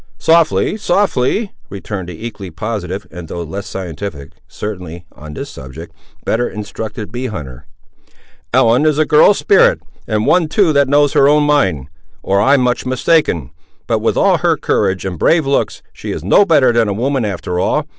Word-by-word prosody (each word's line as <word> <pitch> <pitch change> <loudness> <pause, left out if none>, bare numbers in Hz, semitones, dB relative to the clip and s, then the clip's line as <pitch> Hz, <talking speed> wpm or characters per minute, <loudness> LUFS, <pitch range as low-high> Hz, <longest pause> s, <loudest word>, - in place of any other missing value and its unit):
"Softly, 165 +5 +2
softly," 200 - 0 0.2
returned 95 -2 -6
the 90 +6 -8
equally 105 -5 -7
positive, 95 +2 -5
and, 90 -2 -9
though 85 +2 -5
less 95 +5 -7
scientific, 85 -6 -6 0.2
certainly, 90 -5 -7
on 75 0 -11
this - - -6
subject, 65 -2 -10 0.3
better 120 +2 0
instructed 105 +1 -7
bee 125 +2 -4
hunter; 75 - -8 0.8
"Ellen 120 +7 +3
is 150 -2 +2
a 155 - +3
girl 150 0 +5
of 205 - +3
spirit, 485 +4 +4 0.3
and 110 0 0
one 175 -3 +3
too 165 0 +2
that 140 -2 +3
knows 145 0 +3
her 135 - +5
own 150 0 +4
mind, 95 - +1 0.4
or 100 +1 +1
I'm 135 +3 +4
much 125 -1 0
mistaken; 130 - 0 0.3
but - - 0
with - - 0
all - - +3
her - - +1
courage 95 0 0
and 90 -4 -5
brave 160 -2 +3
looks, 135 0 -1
she - - -8
is - - -5
no 105 - +4
better 140 -8 +4
than 115 -2 +2
a 100 - -1
woman 130 +4 -1
after 90 -3 -3
all. - - 0
110 Hz, 175 wpm, -16 LUFS, 90-145 Hz, 0.8 s, girl